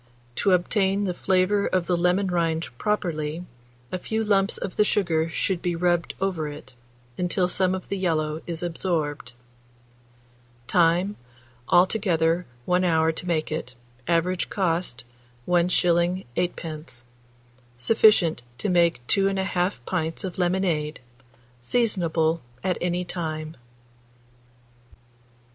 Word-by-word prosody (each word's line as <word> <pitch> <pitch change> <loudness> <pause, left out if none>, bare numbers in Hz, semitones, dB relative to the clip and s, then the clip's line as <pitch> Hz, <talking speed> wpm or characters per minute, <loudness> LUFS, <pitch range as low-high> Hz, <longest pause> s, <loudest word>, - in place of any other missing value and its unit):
To 200 - +2
obtain 195 +2 +2
the 185 -3 -1
flavour 190 +3 +2
of 185 -2 0
the 180 - +1
lemon 180 +3 +2
rind 165 -2 0
properly, 170 -5 -1 0.5
a 185 - -2
few 220 +4 -2
lumps 200 -2 +2
of 190 - -5
the 210 - +4
sugar 165 -6 +1
should 175 +2 -1
be 175 -1 -1
rubbed 175 0 0
over 185 -5 -1
it, 145 -2 -9 0.5
until 180 +1 +1
some 185 +1 +1
of 185 - -7
the 200 - -1
yellow 155 -3 0
is 170 0 -4
absorbed. 160 -7 -2 1.3
Time. 175 +6 +2 0.5
Altogether 175 -3 +3 0.2
1 180 +1 +2
hour 160 -2 +3
to 170 +3 -7
make 160 -3 0
it. 140 -5 -4 0.3
Average 175 +2 +1
cost, 170 -8 -1 0.4
1s. 175 0 +2
8d. 155 -7 -4 0.7
Sufficient 180 - +4 0.2
to 205 - -2
make 170 -8 +2
2 195 +8 +3
1/2 190 -1 0
pints 165 -3 -2
of 185 -1 -5
lemonade. 175 -4 0 0.6
Seasonable 170 - +1 0.2
at 185 -1 0
any 180 0 -1
time. 160 -3 -4
175 Hz, 115 wpm, -25 LUFS, 160-185 Hz, 1.3 s, the